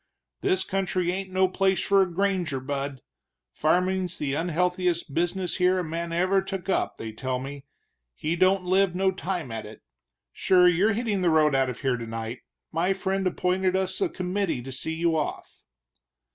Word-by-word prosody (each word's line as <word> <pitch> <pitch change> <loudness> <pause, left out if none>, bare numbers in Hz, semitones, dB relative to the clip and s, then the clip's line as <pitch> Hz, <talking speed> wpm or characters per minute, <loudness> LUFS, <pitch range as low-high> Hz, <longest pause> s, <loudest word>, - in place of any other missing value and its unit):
"This 380 -1 +2
country 185 -2 -1
ain't 190 +1 -4
no 185 0 +3
place 190 0 +1
for 200 -1 +4
a 185 -2 +1
granger, 180 -6 0
bud; 135 -1 -4 0.5
farmin's 180 +3 +1
the 140 -2 -2
unhealthiest 175 0 0
business 175 +3 -1
here 180 0 +3
a 180 - 0
man 165 +1 -4
ever 185 +3 +2
took 195 -1 -5
up, - - 0
they 110 - -6
tell 130 +2 -2
me, 135 +2 -7 0.5
he 155 +2 -1
don't 185 +2 +3
live 185 0 +2
no 190 +1 +2
time 180 -7 -4
at 110 -1 -5
it. 110 - -13 0.5
Sure, 180 -1 +4
you're 185 +5 +3
hittin' 215 -3 -1
the 175 - +3
road 155 -2 +4
out 135 -1 +2
of 125 - -6
here 130 -3 +1
tonight 115 +1 -5 0.3
my 175 +4 +1
friend 195 0 -1
appointed 185 +1 0
us 190 - -1
a 380 - +2
committee 185 - -2
to 135 - -7
see 160 +5 -3
you 165 0 +1
off." 150 -2 -4
180 Hz, 175 wpm, -26 LUFS, 150-190 Hz, 0.5 s, for